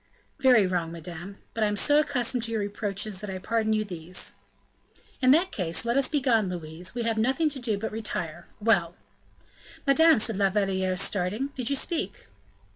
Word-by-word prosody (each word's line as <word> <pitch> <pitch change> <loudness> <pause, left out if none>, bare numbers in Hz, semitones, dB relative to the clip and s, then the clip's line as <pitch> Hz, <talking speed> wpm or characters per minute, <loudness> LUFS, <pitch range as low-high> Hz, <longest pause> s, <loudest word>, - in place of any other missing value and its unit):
"Very 250 -6 +6
wrong, 175 -3 -1
madame; 175 +4 -8 0.2
but 225 - 0
I - - +4
am 210 - -1
so 290 +8 +4
accustomed 260 -4 +1
to 230 - -5
your 225 - 0
reproaches, 205 -1 -3
that 210 - -5
I 190 - -4
pardon 220 +3 0
you 215 0 +1
these." 180 -2 -5 0.9
"In 255 - +4
that 340 +7 +5
case, 170 +1 -2
let 235 +1 +1
us 275 -1 +3
begone, 245 -9 +2
Louise; 175 +2 -5
we 240 - -1
have 225 -1 0
nothing 270 +7 +2
to 275 - -5
do 225 -5 0
but 220 +2 -4
retire. 175 -7 -4
Well!" 190 -6 +2 0.9
"Madame!" 320 +4 +6
said 220 -1 +1
La 200 -1 +3
Valliere 190 -2 0
starting, 200 +7 -1
"did 255 -4 -3
you 280 - +2
speak?" 270 - -3
215 Hz, 185 wpm, -27 LUFS, 185-250 Hz, 0.9 s, Very